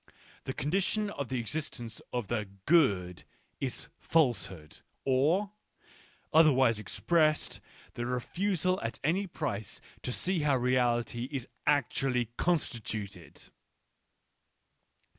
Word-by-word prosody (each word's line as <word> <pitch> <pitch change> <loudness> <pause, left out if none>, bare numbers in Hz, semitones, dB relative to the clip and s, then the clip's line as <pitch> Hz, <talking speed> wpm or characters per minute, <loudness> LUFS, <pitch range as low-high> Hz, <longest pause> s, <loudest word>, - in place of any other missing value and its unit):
The - - -3
con 145 +4 -2
dition 200 +3 +1
of 140 -9 -4
the 130 -1 -1
existence 120 -2 -5
of 120 -4 -2
the 105 -3 -2 0.2
good 100 - +3 0.4
is - - -4
falsehood: 95 - 0 0.3
or, 155 +10 +3 0.8
otherwise 135 -8 +5
expressed, 155 - +1 0.3
the 120 0 -3
refusal 185 +8 0
at 115 -1 -4
any 185 +7 +1
price 125 - -4 0.2
to - - -3
see 180 +7 0
how 145 -3 +3
reality 120 -1 +1
is 135 -4 -3 0.2
actually 130 -4 +1
constituted. 110 - -3
130 Hz, 105 wpm, -31 LUFS, 115-160 Hz, 0.8 s, otherwise